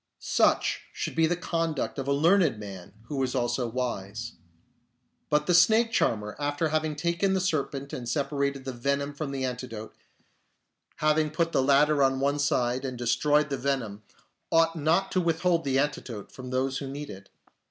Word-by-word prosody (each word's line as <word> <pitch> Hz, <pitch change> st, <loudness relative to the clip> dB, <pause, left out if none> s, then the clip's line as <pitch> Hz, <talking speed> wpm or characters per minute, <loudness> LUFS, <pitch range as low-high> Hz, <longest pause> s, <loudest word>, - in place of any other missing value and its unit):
Such -, -, +2 dB
should -, -, -4 dB
be 165 Hz, 0 st, +3 dB
the 175 Hz, -, +1 dB
conduct 165 Hz, -5 st, -2 dB
of 135 Hz, -, -4 dB
a -, -, +1 dB
learned 160 Hz, -, +3 dB
man 100 Hz, -2 st, -9 dB
who 135 Hz, +3 st, -3 dB
is 130 Hz, 0 st, -1 dB
also 120 Hz, 0 st, 0 dB
wise. 115 Hz, -2 st, -4 dB, 1.0 s
But 150 Hz, 0 st, +2 dB
the 180 Hz, -, +2 dB
snake 220 Hz, +7 st, +5 dB
charmer, 105 Hz, -, 0 dB
after 145 Hz, +2 st, 0 dB
having 155 Hz, 0 st, 0 dB
taken 170 Hz, +5 st, 0 dB
the -, -, +2 dB
serpent 140 Hz, -6 st, -2 dB
and 120 Hz, -2 st, -4 dB
separated 140 Hz, 0 st, -1 dB
the 130 Hz, -, -4 dB
venom 140 Hz, +4 st, -1 dB
from 145 Hz, 0 st, -4 dB
the 135 Hz, -1 st, -2 dB
antidote, 120 Hz, -3 st, -6 dB, 1.0 s
having 155 Hz, 0 st, +2 dB
put 165 Hz, +2 st, 0 dB
the -, -, +2 dB
latter 145 Hz, +2 st, +4 dB
on 135 Hz, -1 st, +3 dB
one 140 Hz, +2 st, +1 dB
side 125 Hz, -3 st, +1 dB
and 130 Hz, -2 st, -4 dB
destroyed 145 Hz, +5 st, +2 dB
the 135 Hz, -, 0 dB
venom, 125 Hz, -6 st, -2 dB, 0.5 s
ought 165 Hz, 0 st, +4 dB
not 165 Hz, +5 st, +1 dB
to 185 Hz, -, +2 dB
withhold 170 Hz, 0 st, +1 dB
the 135 Hz, -1 st, +1 dB
antidote 130 Hz, -7 st, -2 dB
from 130 Hz, -1 st, -9 dB
those 130 Hz, +1 st, -1 dB
who 140 Hz, -, -5 dB
need 145 Hz, +2 st, -6 dB
it. 100 Hz, 0 st, -12 dB
140 Hz, 175 wpm, -27 LUFS, 125-155 Hz, 1.0 s, snake